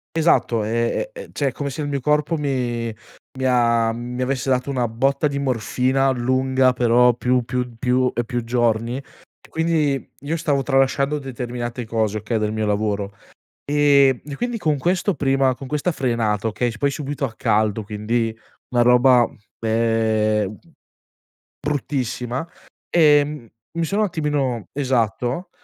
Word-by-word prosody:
Esatto, 155 -8 +2
ehm, 115 - 0
e - - -9
cioè, 140 - -1
è - - -6
come 140 +2 -4
se 140 +3 -5
il 145 - -2
mio 140 -1 -1
corpo 150 +4 +1
mi 120 -5 -2 0.4
mi 130 - -2
ha 115 -2 +3
mi 120 +2 -5
avesse 130 0 -2
dato 130 +1 +1
una 125 -3 0
botta 135 +6 +1
di 140 -1 -3
morfina 130 +1 +1
lunga 130 +1 +2
però 125 0 +4
più 125 +1 +1
più 125 0 -3
più 125 +1 +1
e 120 - 0
più 120 0 -3
giorni, 120 +1 0 0.5
quindi 160 -4 0
io 150 +4 -2
stavo 145 -4 0
tralasciando 135 +2 +1
determinate 120 -2 -5
cose, 110 -2 -1
okay, 110 +2 -2
del 105 0 -1
mio 110 0 -1
lavoro. 105 -1 -1 0.5
Ehm, 140 -3 +4
e 145 -1 -6
quindi 240 +4 -2
con 155 -8 0
questo 180 +6 +1
prima 135 -3 +2
con 135 - -9
questa 150 +5 -1
frenata, 115 - 0
okay, 120 +3 -1
s 110 - -10
poi 140 - +2
subito 140 0 -3
a 120 - -6
caldo, 110 0 +1
quindi 110 +2 -2 0.3
una 120 -1 +2
roba, 125 0 +5 0.3
ehm, 110 -2 +1 1.0
bruttissima 135 -2 -2 0.4
e 150 -4 +5
m 150 -5 -8 0.3
mi 170 - +1
sono 200 +6 0
un 215 - +3
attimino 145 - -1
Esatto, 125 - -1
125 Hz, 150 wpm, -21 LUFS, 115-140 Hz, 1.0 s, roba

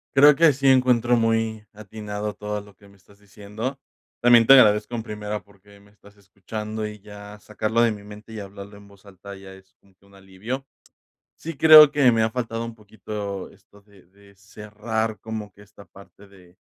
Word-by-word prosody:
Creo 145 +1 +7
que 165 0 +5
sí 135 +1 -2
encuentro 125 -2 +3
muy 115 -1 -1
atinado 105 0 -7
todo 105 0 -6
lo 100 -1 -18
que 100 +2 -21
me 100 0 -21
estás 100 +2 -24
diciendo, 105 +6 -8 0.4
también 120 -2 +5
te 135 - +9
agradezco, 110 -2 +4
en 115 - -5
primera, 105 -1 -6
porque 100 0 -22
me 100 0 -23
estás 105 0 -22
escuchando 105 +2 -7
y 105 0 -11
ya 105 0 -13
sacarlo 110 +2 -2
de 120 -1 +3
mi 105 -1 -9
mente 105 +2 -13
y 110 - -7
hablarlo 100 0 -11
en 100 0 -17
voz 100 0 -21
alta 100 0 -12
ya 95 0 -13
es 95 0 -20
como 100 - -29
que 100 - -30
un 100 - -21
alivio, 100 +8 -8 0.7
sí, 165 0 -8
creo 155 0 +8
que, 140 -4 +3
me 110 -1 +1
ha 110 - -1
faltado 115 -1 -4
un 115 - -8
poquito 105 -2 -8
esto 100 +1 -23
de 100 -2 -23
de 100 +2 -22
cerrar 105 +2 -5
como 110 -1 -7
que 100 - -20
esta 100 0 -17
parte 100 +1 -18
de 90 -2 -21
105 Hz, 195 wpm, -22 LUFS, 100-115 Hz, 0.7 s, te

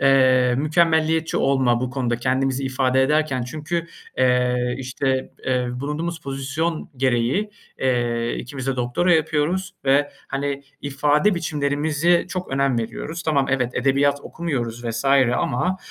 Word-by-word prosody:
eee, 130 -2 +4
mükemmeliyetçi 160 +1 +2
olma 130 -3 +2
bu 130 0 -2
konuda 125 -3 -1
kendimizi 130 +2 0
ifade 130 0 +2
ederken 150 -2 +1
çünkü, 155 +6 -3 0.3
eee, 125 -1 +2
işte, 130 0 -2 0.2
eee, 125 -1 +1
bulunduğumuz 160 +4 -3
pozisyon 140 +5 -3
gereği, 130 - +1 0.3
eee, 120 -2 0
2'miz 130 +1 -6
de 135 -1 -1
doktora 125 +9 +2
yapıyoruz 160 +4 0
ve, 140 +2 +3 0.2
hani, 140 +1 -2 0.2
ifade 145 +7 +2
biçimlerimize 155 +1 +1
çok 185 0 -5
önem 135 -2 +1
veriyoruz. 155 +8 -5
Tamam, 140 -4 +1
evet, 125 -2 +1
edebiyat 140 +2 +2
okumuyoruz 120 -8 -4
vs. 115 +3 -3 0.3
ama, 180 +10 0
135 Hz, 125 wpm, -22 LUFS, 125-155 Hz, 0.3 s, eee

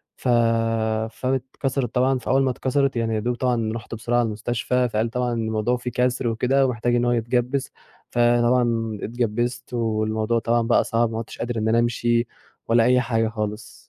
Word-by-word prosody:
ف - - -6 0.8
فاتكسرت 130 0 -2
طبعًا 130 +1 +2
فأول 135 +3 +1
ما 130 - +2
اتكسرت 135 +1 0
يعني 115 -1 0
يا - - 0
دوب 120 +3 -1
طبعًا 120 -3 0
رُحت 115 0 -6
بسرعة 120 +2 -1
على 120 - +2
المستشفى 120 +3 -1
فقال 110 +1 0
طبعًا 125 0 -1
الموضوع 110 +1 0
في 125 0 -4
كسر 125 +1 0
وكده 130 +4 +2
ومحتاج 120 -1 0
إن 120 0 +2
هو 120 - +2
يتجبس، 120 +3 0 0.4
فطبعًا 120 -2 +2
اتجبست 120 +2 -2
والموضوع 110 0 0
طبعًا 120 +1 +1
بقى 120 - +4
صعب 115 0 0
ما 110 - -4
عدتش 115 - -6
قادر 120 0 -3
إن 110 0 -1
أنا 115 +1 +3
أمشي 120 0 +1 0.4
ولا 115 0 +4
أي 125 +1 +4
حاجة 115 -2 0
خالص. 105 0 -5
120 Hz, 175 wpm, -23 LUFS, 115-125 Hz, 0.8 s, بقى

